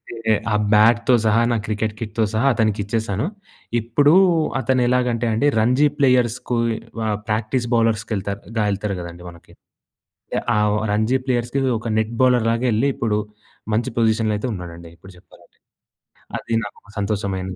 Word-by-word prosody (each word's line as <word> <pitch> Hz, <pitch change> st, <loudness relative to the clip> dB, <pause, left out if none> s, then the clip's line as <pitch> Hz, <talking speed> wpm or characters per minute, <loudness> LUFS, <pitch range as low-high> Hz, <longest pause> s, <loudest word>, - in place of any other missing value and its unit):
అయితే 110 Hz, -1 st, 0 dB, 0.2 s
ఆ -, -, +3 dB, 0.2 s
బ్యాట్‍తో 115 Hz, +4 st, +4 dB
సహా 110 Hz, +1 st, +3 dB
నా 120 Hz, -, +1 dB
క్రికెట్ 110 Hz, 0 st, -2 dB
కిట్‌తో 115 Hz, 0 st, -2 dB
సహా 110 Hz, +5 st, +1 dB
అతనికిచ్చేసాను. 110 Hz, 0 st, -1 dB, 0.5 s
ఇప్పుడు 130 Hz, +7 st, +3 dB, 0.5 s
అతనెలాగంటే 125 Hz, -2 st, +1 dB
అండి 115 Hz, +7 st, +2 dB
రంజీ 125 Hz, +6 st, +3 dB
ప్లేయర్స్‌ 125 Hz, -4 st, +3 dB
కొయ్ 115 Hz, -1 st, +1 dB, 0.3 s
ఆహ్, 105 Hz, -1 st, 0 dB
ప్రాక్టీస్ 110 Hz, +3 st, -1 dB
బౌలర్స్‌కెళ్తార్ 110 Hz, -3 st, 0 dB, 0.2 s
గా 110 Hz, -, +2 dB
వెళ్తారు 100 Hz, 0 st, -2 dB
గదండీ 85 Hz, 0 st, -9 dB
మనకి. 85 Hz, -1 st, -16 dB, 0.8 s
య్ -, -, 0 dB
ఆ -, -, +2 dB, 0.4 s
రంజీ 110 Hz, +5 st, +2 dB
ప్లేయర్స్‌కి 120 Hz, +1 st, -1 dB, 0.2 s
ఒక 115 Hz, -, -7 dB
నెట్ 110 Hz, +1 st, -1 dB
బౌలర్‌లాగెళ్లి 120 Hz, 0 st, +2 dB
ఇప్పుడు 110 Hz, -3 st, 0 dB, 0.6 s
మంచి 115 Hz, +4 st, 0 dB
పొజిషన్‍లైతే 110 Hz, 0 st, +1 dB
ఉన్నాడండి. 85 Hz, -3 st, -9 dB
ఇప్పుడు 95 Hz, +3 st, -15 dB
జెప్పాలంటే. -, -, -22 dB, 0.8 s
అది 115 Hz, -, -6 dB
నాకు 105 Hz, -, -10 dB
ఒక 105 Hz, -, -22 dB
సంతోషమైంది. 95 Hz, -2 st, -2 dB
110 Hz, 135 wpm, -21 LUFS, 105-120 Hz, 0.8 s, బ్యాట్‍తో